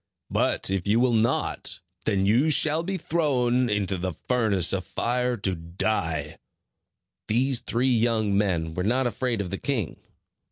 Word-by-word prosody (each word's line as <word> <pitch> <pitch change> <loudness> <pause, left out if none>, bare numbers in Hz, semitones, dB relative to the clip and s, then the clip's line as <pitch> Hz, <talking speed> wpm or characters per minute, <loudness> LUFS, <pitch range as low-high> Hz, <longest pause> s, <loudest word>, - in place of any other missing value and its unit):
But - - 0
if 95 0 -1
you 110 +3 +3
will 125 -1 +3
not, 115 +1 0 0.3
then 95 -1 +1
you 120 +10 +3
shall 155 +1 +3
be 190 +3 -3
thrown 130 -8 +1
into 100 -2 -1
the 90 0 -2
furnace 105 -3 +1
of 95 -2 -1
fire, 125 +3 -1
to 95 -2 -1
die." 85 0 -2 0.9
These 125 +3 +2
three 125 +2 0
young 110 -3 +1
men 85 -6 0
were 90 - -2
not 125 +6 +1
afraid 120 -1 -1
of 90 - -5
the 95 - -3
king. 120 - -2
110 Hz, 155 wpm, -25 LUFS, 95-125 Hz, 0.9 s, you